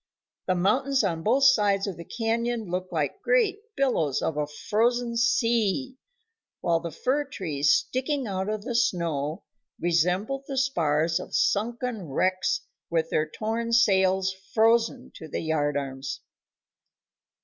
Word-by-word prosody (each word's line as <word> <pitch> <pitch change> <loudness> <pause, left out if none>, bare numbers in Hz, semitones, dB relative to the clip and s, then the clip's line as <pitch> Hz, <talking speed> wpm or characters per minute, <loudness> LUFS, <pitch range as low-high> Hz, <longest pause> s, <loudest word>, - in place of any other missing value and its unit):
The 185 - +2
mountains 260 +9 +2
on 170 -5 -1
both 250 +9 +2
sides 205 -7 +4
of 195 -4 -4
the 170 - -9
canyon 230 -1 -2
looked 185 +1 -3
like 160 - -2
great 455 -5 +2 0.2
billows 165 - +1
of 160 - -1
a 150 -1 -1
frozen 235 +9 0
sea, 235 +1 +1 0.6
while 170 -1 +1
the 170 0 -5
fir 265 - 0
trees 150 - 0
sticking 265 +1 0
out 190 -1 -2
of 215 -1 -3
the 245 +1 -4
snow 170 -10 0 0.4
resembled 180 - 0
the 275 - -4
spars 165 - +1
of - - -6
sunken 230 -2 0
wrecks 185 +5 +1 0.3
with 165 -1 0
their 155 0 +1
torn 230 +5 -3
sails 190 -4 +3
frozen 225 +4 +1
to 160 - -9
the - - -4
yardarms. 140 -4 -2
200 Hz, 135 wpm, -26 LUFS, 165-240 Hz, 0.6 s, sides